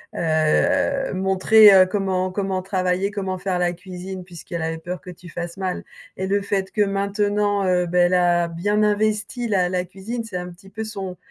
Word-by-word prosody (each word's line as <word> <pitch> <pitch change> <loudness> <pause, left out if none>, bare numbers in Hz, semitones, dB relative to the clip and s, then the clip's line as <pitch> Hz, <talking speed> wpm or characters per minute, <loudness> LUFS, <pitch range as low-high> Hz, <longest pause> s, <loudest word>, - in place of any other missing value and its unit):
heu - - -6
heu, 170 - +1
montré, 190 +3 +6
heu, 190 -1 +7
comment 185 -1 -1
comment 190 -1 -2
travailler, 185 +1 -1
comment 190 -2 -3
faire 185 -1 -2
la 175 0 +1
cuisine 185 +1 -8
puisqu'elle 170 -1 -7
avait 160 0 -2
peur 175 +2 -6
que - - -11
tu 180 0 -12
fasses 170 +1 -6
mal 185 -2 -3 0.3
et 190 - -3
le 200 +1 +1
fait 195 -1 -2
que 210 - 0
maintenant, 205 0 0
heu, 180 -1 +2
beh 180 +1 +1
elle 175 +1 +2
a 175 -1 +3
bien 205 +6 0
investi 215 +2 0
la 185 -3 +2
la 180 0 -1
cuisine, 195 +6 -6
c'est 210 -5 -6
un 180 0 -5
petit 180 +2 -15
peu 220 +3 -5
son 195 -4 -6
190 Hz, 195 wpm, -22 LUFS, 180-205 Hz, 0.3 s, heu